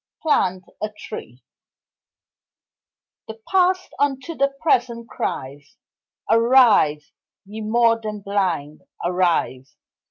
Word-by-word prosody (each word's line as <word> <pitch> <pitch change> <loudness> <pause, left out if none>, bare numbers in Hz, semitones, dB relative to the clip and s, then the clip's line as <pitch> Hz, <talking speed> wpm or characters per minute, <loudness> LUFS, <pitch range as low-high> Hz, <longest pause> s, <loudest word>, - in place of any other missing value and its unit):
Plant 185 - +1 0.2
a 215 - -2
Tree 125 - -9 1.8
The 220 0 -9
Past 370 0 +1
unto 285 +3 -1
the 275 -2 +1
Present 235 -6 0
cries 140 +8 -6 0.5
Arise, 230 - +4 0.3
ye 215 +3 -8
more 230 +1 +2
than 210 -1 -5
blind, 180 -7 -2 0.2
arise! 175 -7 0
215 Hz, 90 wpm, -21 LUFS, 175-250 Hz, 1.8 s, Arise